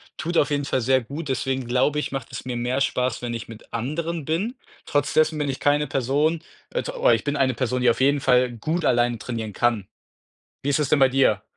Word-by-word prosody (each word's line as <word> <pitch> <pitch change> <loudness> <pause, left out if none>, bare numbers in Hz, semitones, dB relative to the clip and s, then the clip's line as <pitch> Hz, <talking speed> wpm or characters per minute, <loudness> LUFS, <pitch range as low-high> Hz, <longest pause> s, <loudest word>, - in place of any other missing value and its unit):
tut 170 +2 -2
auf 145 - +3
jeden 145 0 0
Fall 140 -2 0
sehr 130 +2 +2
gut. 145 +6 -7
Deswegen 130 -1 -1
glaube 130 +5 +2
ich, 150 - -4
macht 135 - -5
es - - -7
mir 125 -1 -3
mehr 125 +2 -1
Spaß, 125 -3 0
wenn 120 -1 -3
ich 115 -1 -6
mit 115 -1 -13
anderen 155 +7 -3
bin. 185 - -1 0.3
Trotz 145 0 0
dessen 155 0 +3
bin 145 -2 -1
ich 135 - -3
keine 145 +1 +2
Person 145 +5 +1 0.3
äh, - - -2
t - - -4
oder - - +4
ich - - -1
bin 145 0 0
eine 130 -3 +2
Person, 125 +1 -1
die 125 - +5
auf 120 - +1
jeden 140 +1 +3
Fall 125 -1 +4
gut 160 +9 -2
alleine 120 -1 +2
trainieren 110 -1 -5
kann. 110 -2 0 0.8
Wie 145 - 0
ist 145 - +2
das 150 - 0
denn - - +4
bei 135 - +6
dir? 125 -6 +2
135 Hz, 240 wpm, -24 LUFS, 125-150 Hz, 0.8 s, bei